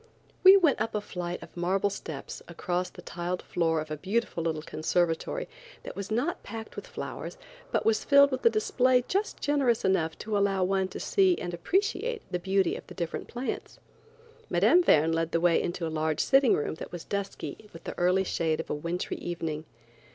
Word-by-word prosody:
We 385 +1 +10
went 320 - +3
up 220 0 -1
a - - +2
flight 180 -3 -5
of - - -14
marble 190 +3 +1
steps 160 -7 -7
across 180 +1 -2
the - - -13
tiled 175 +1 -4
floor 165 -2 0
of 155 0 -6
a 155 - -2
beautiful 195 +2 -1
little 160 -2 -2
conservatory 170 - -1 0.4
that - - -7
was 200 0 -5
not 245 +10 -1
packed 220 +1 -8
with - - -7
flowers 485 - -6 0.3
but - - 0
was 225 -1 +2
filled 280 0 +6
with 260 - -3
a - - +7
display 250 +3 +2
just 400 +3 -1
generous 275 -7 +2
enough 165 -4 +1
to 215 -1 -3
allow 200 -2 +2
one 190 0 +1
to - - -8
see 380 -3 +3
and 175 - -4
appreciate 405 - -1
the 180 - -1
beauty 190 0 +1
of - - -9
the - - -11
different 170 -3 -4
plants. 245 +2 -5 0.7
Mme. 355 - +5
Verne 160 - +4
led 165 0 -1
the 165 - +3
way 170 0 +3
into 175 0 -3
a - - -2
large 155 -1 0
sitting 270 -2 +5
room 145 - -2
that - - -7
was 175 -2 -7
dusky 200 +1 -5
with 165 - -12
the - - -6
early 180 +2 +3
shade 165 -3 0
of 160 - -4
a - - +1
wintry 170 +4 -3
evening. 160 -3 -4
190 Hz, 195 wpm, -28 LUFS, 170-235 Hz, 0.7 s, We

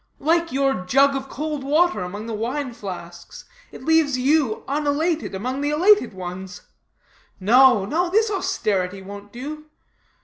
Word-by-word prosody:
Like 335 +3 +1
your 270 -7 0
jug 275 +6 +4
of 270 0 -5
cold 300 0 -4
water 320 +4 +2
among 200 +4 -6
the 230 - -5
wine 250 +4 -3
flasks, 175 -5 -9 0.3
it - - -11
leaves 320 -4 +3
you 265 -3 +1
unelated 300 - -1
among 255 +8 -3
the 290 - 0
elated 350 - +4
ones. 185 +1 -7 0.8
No, 235 +1 +5
no. 345 - 0
This 435 +3 +2
austerity 200 - -1
won't 200 +1 -10
do. 300 +6 -8
270 Hz, 140 wpm, -22 LUFS, 205-310 Hz, 0.8 s, No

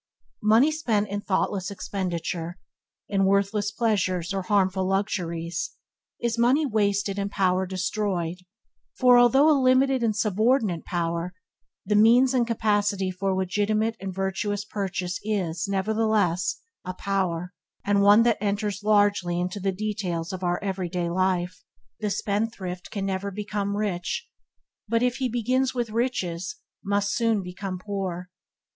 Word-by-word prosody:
Money 225 +8 +5
spent 225 -10 0
in 205 +1 -3
thoughtless 190 -1 -1
expenditure 175 -3 -4 0.3
– - - -66
in 195 -1 +1
worthless 200 +1 +1
pleasures 195 -6 0
or 195 - -1
harmful 190 -1 +1
luxuries 170 -4 -2 0.2
– - - -66
is 235 -1 -1
money 260 +6 +4
wasted 205 -4 0
and 200 0 -1
power 185 -1 +1
destroyed; 185 -2 -2 0.6
for, 250 -1 +6
although 265 +5 +5
a 315 - +6
limited 260 0 +3
and 225 -2 +1
subordinate 215 - +1
power, 170 0 -2 0.5
the 210 - 0
means 235 +5 +5
and 245 -2 +2
capacity 205 -4 +1
for 190 +1 -1
legitimate 210 +4 0
and 195 -1 -5
virtuous 195 +2 -2
purchase 190 -3 -3
is, 185 -6 -1
nevertheless, 200 -2 +1 0.2
a 185 0 -5
power, 180 -3 -2 0.3
and 200 0 +3
one 205 +3 +7
that 235 -4 +2
enters 205 -1 -1
largely 205 -4 +2
into 180 +3 -2
the 195 0 0
details 190 -4 -3
of 185 0 -6
our 175 0 0
everyday 180 -3 -2
life. 180 -1 0 0.4
The 210 -1 -1
spendthrift 200 -3 -3
can 200 -2 -3
never 195 +1 -2
become 205 0 -3
rich, 205 - -2 0.6
but 230 +2 +1
if 250 0 +1
he 260 -2 -1
begin 245 +3 +1
with 240 -3 -2
riches, 225 - -2 0.3
must 200 0 0
soon 225 -4 +1
become 185 +1 -5
poor. 185 -2 -4
200 Hz, 140 wpm, -25 LUFS, 185-215 Hz, 0.6 s, one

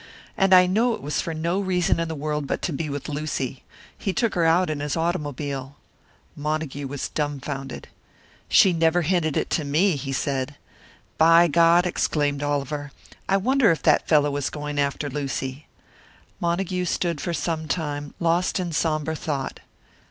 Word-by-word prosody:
"And 195 0 +2
I 180 -1 +8
know 225 +6 +2
it - - -12
was 150 +1 -1
for 165 - -4
no 170 +4 -1
reason 180 -4 +1
in 165 - -1
the 160 - -4
world 150 -1 -3
but - - -3
to 170 - -1
be 155 +2 -3
with 145 -1 -5
Lucy. 145 -4 -3 0.3
He 195 - -3
took 230 0 0
her 170 -2 +2
out 170 +3 +4
in 150 - -3
his 145 +2 -2
automobile." 145 -5 -3 0.6
Montague 150 -2 -3
was 140 0 -4
dumfounded. 140 -2 -4 0.6
"She 190 - +6
never 165 +1 +2
hinted 160 -3 +1
it - - -1
to 155 - +1
me," 160 +6 +2
he 135 0 -5
said. 135 0 -2 0.6
"By 165 +2 +7
God!" 170 +2 +5
exclaimed 145 -5 0
Oliver, 145 0 -2 0.4
"I 195 - +4
wonder 255 +4 +3
if 165 - +1
that - - +3
fellow 145 -2 +3
is 145 - -1
going 150 -1 -4
after 140 +1 -1
Lucy!" 135 0 -4 0.7
Montague 180 +1 -1
stood 170 -3 -1
for 175 - -2
some 160 0 -2
time, 145 -2 -3
lost 170 +3 +1
in 175 -2 -2
sombre 155 0 0
thought. 145 -4 -4
155 Hz, 165 wpm, -24 LUFS, 145-175 Hz, 0.7 s, I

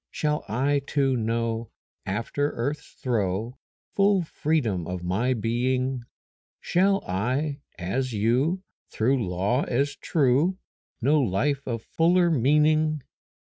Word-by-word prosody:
Shall 150 0 -1
I 135 +6 +1
too 135 -3 +1
know 115 -1 -1 0.4
After 115 +9 -1
earth's 140 +6 -4
throe 115 0 -2 0.3
Full 200 -2 +3
freedom 130 - -1
of 90 -1 -4
my 110 +9 +1
being? 125 +3 0 0.6
Shall 195 +2 +2
I, 130 +10 -1 0.2
as 125 +9 -2
you, 125 - +1 0.3
Through 125 +2 +1
law 100 +9 +1
as 140 +4 0
true, 150 +5 +2 0.5
Know 150 +4 +4
life 135 +6 0
of 115 -3 -3
fuller 175 +1 +3
meaning? 150 +2 +3
130 Hz, 110 wpm, -26 LUFS, 115-150 Hz, 0.6 s, Know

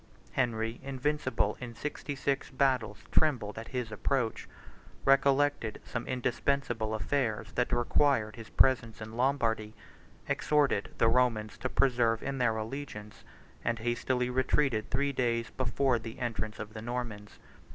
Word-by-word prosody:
Henry, 115 -2 0
invincible 135 +1 0
in 120 -2 -7
sixty 150 +1 -4
six 135 0 -1
battles, 130 -6 +1
trembled 115 -9 +2
at 115 - -8
his 125 -4 -3
approach; 115 +2 -1 0.6
recollected 135 -3 +3
some 115 -1 -4
indispensable 125 -3 0
affairs 110 -2 -1
that 125 0 0
required 120 -2 +2
his 115 -2 -10
presence 120 -4 +3
in 110 +1 -7
Lombardy; 115 -4 +1 0.5
exhorted 145 -9 +2
the 115 - +4
Romans 115 -3 +2
to 130 - -2
persevere 120 -4 +3
in 135 +1 -3
their 115 -3 +2
allegiance; 110 -2 -6 0.4
and 115 0 0
hastily 125 +2 0
retreated 130 -3 +1
three 140 +3 +1
days 120 -2 0
before 130 0 +1
the 115 +1 -8
entrance 115 -3 -3
of 105 0 -7
the 110 - -6
Normans. 115 -3 -5
120 Hz, 130 wpm, -31 LUFS, 110-135 Hz, 0.6 s, the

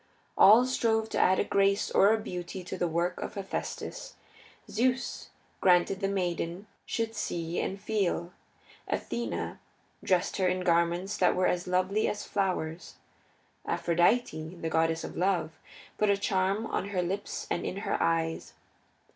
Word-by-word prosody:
All 225 +5 +8
strove 225 -3 +1
to - - -1
add 185 +1 +4
a - - +2
grace 200 0 +2
or 200 +2 +5
a 225 - +3
beauty 180 -3 -6
to 180 - -6
the 175 -1 0
work 170 +2 -1
of - - -5
Hephaestus. 195 -1 -5 0.5
Zeus 255 +3 -1 0.3
granted 180 +1 +3
that 195 - 0
the - - -2
maiden 180 0 -2 0.2
should 225 -1 -2
see 170 -5 -3
and 195 - -3
feel. 195 -4 -1 0.6
Athene 235 - -3 0.4
dressed 180 -2 +1
her 190 -2 +2
in 185 0 0
garments 175 +3 +1
that 180 - +3
were 185 - +2
as 180 0 0
lovely 185 +4 +1
as 210 - -3
flowers. 180 -4 -2 0.7
Aphrodite, 175 -1 +1
the 165 - -2
goddess 165 0 +1
of - - -7
love, 175 -4 0 0.4
put 210 - +3
a 200 - +4
charm 195 +2 0
on 200 - -2
her 185 -3 0
lips 195 +4 -3
and - - -1
in 190 - -3
her - - 0
eyes. 165 -1 0
185 Hz, 155 wpm, -29 LUFS, 175-200 Hz, 0.7 s, All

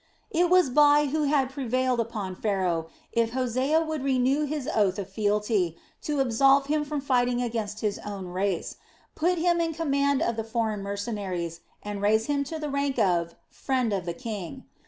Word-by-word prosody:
It 345 +1 +2
was 360 -7 +4
Bai 295 +1 +5
who 305 0 +1
had 275 -2 +2
prevailed 255 -1 0
upon 215 -5 -3
Pharaoh, 180 -6 -1 0.2
if 230 -1 +1
Hosea 260 +5 +1
would 315 -3 -3
renew 270 +2 +2
his 290 -2 -4
oath 200 -3 +2
of 200 -3 -4
fealty, 205 -3 0 0.2
to 295 -2 -2
absolve 270 +2 +4
him 300 +1 0
from 295 -1 -3
fighting 250 -2 +1
against 225 -3 -3
his 210 -2 -1
own 200 -2 -6
race, 185 0 -2 0.4
put 350 +3 +1
him 340 0 +2
in 330 -1 -1
command 280 -3 +1
of 230 -1 -1
the 225 - -1
foreign 220 -2 -2
mercenaries 200 -5 -4 0.2
and 205 -1 -5
raise 220 +2 +3
him 285 -1 0
to 320 - -5
the 305 -1 -4
rank 280 -1 -1
of 175 -6 +2
a 170 - -22 0.2
"friend 255 -5 0
of 190 -3 -2
the 170 - -2
king." 220 0 -6
245 Hz, 180 wpm, -27 LUFS, 205-280 Hz, 0.4 s, Bai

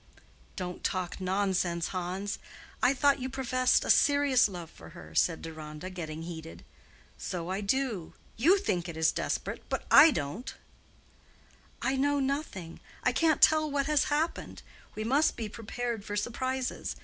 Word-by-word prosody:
"Don't 180 -2 -5
talk 185 0 -2
nonsense, 185 -3 0
Hans. 185 +2 -3 0.4
I 250 - +5
thought 280 0 +3
you 260 +1 -3
professed 255 -1 +1
a - - +4
serious 285 -5 +4
love 175 -4 -8
for 80 - -13
her," 80 -1 -11
said 165 - +1
Deronda, 155 +2 -7
getting 160 -3 -6
heated. 165 -1 -8 0.5
"So 180 -1 -4
I 190 +2 -2
do. 215 -4 -1 0.2
You 335 - +5
think 180 - -1
it 160 -1 +1
desperate, - - -3
but - - -2
I 325 - +10
don't." 180 - -4 1.3
"I 265 0 +1
know 285 +1 +2
nothing; 265 - -3 0.2
I - - +3
can't 315 +4 +2
tell 310 -1 +5
what 280 -1 0
has 300 0 +2
happened. 305 +3 -2 0.3
We 215 - -3
must 275 +7 +2
be 225 - -3
prepared 230 +1 -4
for 205 - -5
surprises. 255 +4 -2
210 Hz, 150 wpm, -29 LUFS, 175-270 Hz, 1.3 s, I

